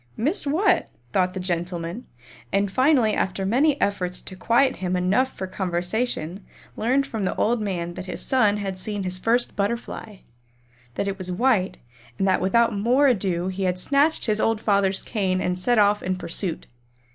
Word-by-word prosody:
"Missed 295 Hz, -, +1 dB
what?" 355 Hz, +4 st, +2 dB, 0.2 s
thought 185 Hz, 0 st, +1 dB
the -, -, -3 dB
gentlemen, 175 Hz, +3 st, -3 dB, 0.4 s
and 200 Hz, 0 st, +1 dB
finally 255 Hz, -2 st, +3 dB
after 190 Hz, 0 st, -1 dB
many 275 Hz, +7 st, +2 dB
efforts 180 Hz, -3 st, 0 dB
to 185 Hz, -, -8 dB
quiet 240 Hz, +7 st, +2 dB
him 185 Hz, -1 st, -2 dB
enough 195 Hz, +9 st, +1 dB
for 190 Hz, -, -3 dB
conversation 185 Hz, 0 st, -2 dB, 0.3 s
learned 260 Hz, +5 st, +1 dB
from 225 Hz, -6 st, -4 dB
the 185 Hz, -, -1 dB
old 230 Hz, +1 st, +1 dB
man 175 Hz, -4 st, -3 dB
that 185 Hz, +2 st, -7 dB
his -, -, -4 dB
son 215 Hz, -6 st, +2 dB
had 195 Hz, -2 st, -4 dB
seen 205 Hz, +1 st, -3 dB
his 185 Hz, 0 st, -3 dB
first 235 Hz, +5 st, +1 dB
butterfly, 215 Hz, 0 st, -3 dB, 0.8 s
that 200 Hz, -, -2 dB
it 195 Hz, 0 st, -3 dB
was 185 Hz, -1 st, -3 dB
white 200 Hz, -1 st, +1 dB, 0.4 s
and 195 Hz, -, +1 dB
that 190 Hz, -, +2 dB
without 230 Hz, +5 st, +3 dB
more 245 Hz, +8 st, +3 dB
ado 190 Hz, -8 st, +1 dB
he 190 Hz, +1 st, -3 dB
had 180 Hz, 0 st, 0 dB
snatched 285 Hz, -, +2 dB
his 215 Hz, -1 st, +1 dB
old 225 Hz, -1 st, +1 dB
father's 200 Hz, -3 st, +1 dB
cane 190 Hz, -4 st, -1 dB
and 180 Hz, 0 st, -1 dB
set 240 Hz, +6 st, +2 dB
off 205 Hz, 0 st, +4 dB
in 185 Hz, 0 st, -1 dB
pursuit. 175 Hz, -1 st, -3 dB
200 Hz, 175 wpm, -24 LUFS, 185-235 Hz, 0.8 s, off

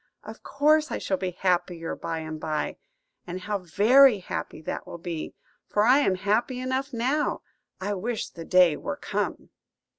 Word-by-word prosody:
Of -, -, -10 dB
course 305 Hz, +2 st, +2 dB
I -, -, -1 dB
shall 190 Hz, -, -1 dB
be 185 Hz, -, -2 dB
happier 175 Hz, -2 st, -1 dB
by 165 Hz, -1 st, -4 dB
and 155 Hz, 0 st, -6 dB
by; 155 Hz, -1 st, -2 dB, 0.5 s
and 180 Hz, +1 st, -5 dB
how 205 Hz, +2 st, -2 dB
very 215 Hz, -, +5 dB
happy 185 Hz, -, -5 dB
that -, -, -5 dB
will -, -, -7 dB
be, 170 Hz, -2 st, -5 dB, 0.3 s
for 210 Hz, -, +2 dB
I 255 Hz, +5 st, +6 dB
am 195 Hz, -10 st, +2 dB
happy 220 Hz, +7 st, 0 dB
enough 260 Hz, +2 st, -2 dB
now. 260 Hz, +5 st, 0 dB, 0.4 s
I 205 Hz, +2 st, -2 dB
wish 220 Hz, +4 st, -3 dB
the 165 Hz, -, -9 dB
day 180 Hz, -3 st, +5 dB
were -, -, -5 dB
come!" -, -, -3 dB
195 Hz, 170 wpm, -26 LUFS, 175-255 Hz, 0.5 s, I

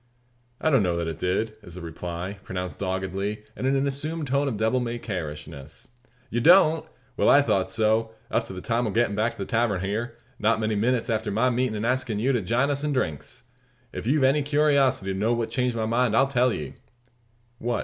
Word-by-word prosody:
"I 160 Hz, -, +1 dB
don't 135 Hz, -5 st, +5 dB
know 90 Hz, -3 st, 0 dB
that 85 Hz, -1 st, -2 dB
it 80 Hz, 0 st, -5 dB
did," 100 Hz, +5 st, 0 dB
is 90 Hz, -5 st, -11 dB
the 90 Hz, -, -7 dB
reply, 85 Hz, +3 st, -6 dB
pronounced 90 Hz, -5 st, -5 dB
doggedly, 95 Hz, +2 st, -3 dB
and 130 Hz, -, -2 dB
in 135 Hz, -, +2 dB
an 135 Hz, +1 st, +1 dB
assumed 150 Hz, +3 st, -2 dB
tone 140 Hz, +1 st, +1 dB
of 120 Hz, -6 st, -2 dB
devil 110 Hz, +4 st, +1 dB
may 120 Hz, -1 st, -3 dB
care 90 Hz, -9 st, -4 dB
ishness. 75 Hz, -, -10 dB, 0.4 s
"You 120 Hz, -, 0 dB
don't! 165 Hz, 0 st, +5 dB, 0.3 s
Well, -, -, +3 dB
I -, -, +7 dB
thought -, -, +1 dB
so, 110 Hz, +1 st, +1 dB, 0.2 s
up -, -, +1 dB
to -, -, -8 dB
the 90 Hz, -, -7 dB
time 120 Hz, +2 st, 0 dB
o' -, -, -1 dB
gettin' 110 Hz, 0 st, +1 dB
back 110 Hz, +3 st, 0 dB
to -, -, -19 dB
the 100 Hz, -, -4 dB
tavern 115 Hz, -5 st, 0 dB
hyar 110 Hz, +5 st, -3 dB, 0.2 s
not 110 Hz, 0 st, +2 dB
many 110 Hz, 0 st, 0 dB
minutes 115 Hz, +3 st, +1 dB
afore 110 Hz, -2 st, -1 dB
my 120 Hz, +5 st, +2 dB
meetin' 125 Hz, -2 st, 0 dB
and 105 Hz, +1 st, -2 dB
askin' 125 Hz, -3 st, 0 dB
you 125 Hz, +6 st, +1 dB
to 120 Hz, -4 st, +1 dB
jine 120 Hz, +9 st, +1 dB
us 140 Hz, +1 st, -2 dB
in 150 Hz, -1 st, 0 dB
drinks. 80 Hz, -, -3 dB, 0.5 s
If -, -, -5 dB
you've 140 Hz, +2 st, +3 dB
any 135 Hz, +3 st, +4 dB
curiosity 140 Hz, -8 st, +2 dB
to 95 Hz, -, -4 dB
know 110 Hz, +4 st, +2 dB
what 115 Hz, -1 st, -2 dB
changed 125 Hz, 0 st, 0 dB
my 110 Hz, -1 st, -1 dB
mind, 115 Hz, 0 st, +2 dB
I'll 135 Hz, -, +6 dB
tell 125 Hz, -2 st, +2 dB
ye." 75 Hz, -9 st, -5 dB, 0.9 s
"What?" 120 Hz, +1 st, -1 dB
115 Hz, 220 wpm, -25 LUFS, 95-130 Hz, 0.9 s, I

